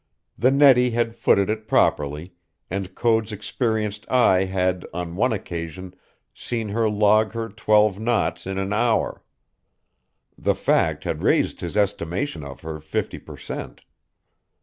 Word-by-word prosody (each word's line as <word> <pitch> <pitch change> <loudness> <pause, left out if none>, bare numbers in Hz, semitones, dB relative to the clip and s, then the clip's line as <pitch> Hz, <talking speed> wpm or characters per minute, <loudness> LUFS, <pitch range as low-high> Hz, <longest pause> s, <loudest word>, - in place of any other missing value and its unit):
The 125 - +3
Nettie 135 -3 +5
had 115 -1 -1
footed 100 -4 +2
it 110 0 -3
properly, 75 +3 +1 0.4
and 95 0 -4
Code's 115 -2 +1
experienced 105 -1 -2
eye 95 -7 +4
had, 95 -1 -1
on 90 -1 -4
one 125 +7 +2
occasion, 90 -2 -5 0.4
seen 115 -3 -4
her 110 +1 +1
log 105 +1 +3
her 115 -1 -4
twelve 105 -1 +2
knots 115 -3 -1
in 95 0 -3
an 95 +1 -2
hour. 115 +1 0 1.1
The - - 0
fact - - +1
had - - -3
raised - - +1
his 85 +4 -4
estimation 95 - -1
of 70 -2 -9
her 80 -1 -6
fifty 80 0 -4
per - - -12
cent. - - -7
105 Hz, 140 wpm, -23 LUFS, 90-115 Hz, 1.1 s, Nettie